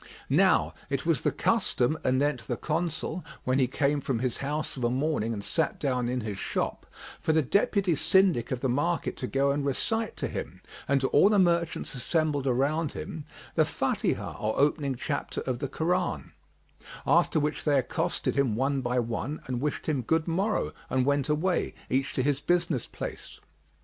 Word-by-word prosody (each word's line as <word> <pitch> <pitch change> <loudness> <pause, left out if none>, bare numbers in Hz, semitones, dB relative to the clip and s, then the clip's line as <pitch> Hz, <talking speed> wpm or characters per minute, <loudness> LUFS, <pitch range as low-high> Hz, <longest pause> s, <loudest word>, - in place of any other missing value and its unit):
Now - - +4 0.2
it - - -2
was - - +2
the - - +1
custom 125 +5 +1
anent 130 -2 +1
the 120 - -2
Consul 165 +1 -2 0.2
when 130 +2 +1
he 130 - +3
came 140 +3 +1
from 130 -2 -1
his 125 0 -1
house 150 +2 -3
of 130 - -5
a 120 - +3
morning 130 -3 0
and 105 -3 -4
sat 160 +7 -1
down 125 -4 0
in 125 0 -1
his 105 -3 -5
shop, - - -2 0.3
for 160 - +1
the 160 -1 +3
Deputy 195 - +2
Syndic 185 - +3
of 125 -1 -2
the 135 - +1
market 145 +7 0
to 130 - -3
go 140 +2 +2
and 140 +1 -1
recite 225 - -1
to - - -1
him - - -6 0.3
and 140 0 +2
to 135 - +2
all 195 - +6
the 210 - +3
merchants 170 -3 +1
assembled 145 +1 0
around 140 +5 +1
him 155 -3 -6 0.3
the - - +3
Fбtihah - - -1
or 110 +1 -1
opening 140 -1 +2
chapter 125 - -3
of 125 -2 -2
the 140 - -2
Koran,[FN#36] 175 +5 -1 0.7
after - - +3
which 150 0 -1
they 145 -2 +3
accosted 130 - -1
him 135 -6 +2
one 135 +3 +1
by 125 0 -1
one 120 +4 -2
and 125 -1 -3
wished 150 0 -2
him 145 -5 +1
good 160 +7 0
morrow 195 +6 0 0.2
and 130 -1 +1
went 140 0 +1
away, 165 +5 0 0.2
each 135 +1 0
to 130 - +1
his 145 0 +1
business 170 -6 +1
place. - - -7
140 Hz, 185 wpm, -28 LUFS, 130-160 Hz, 0.7 s, all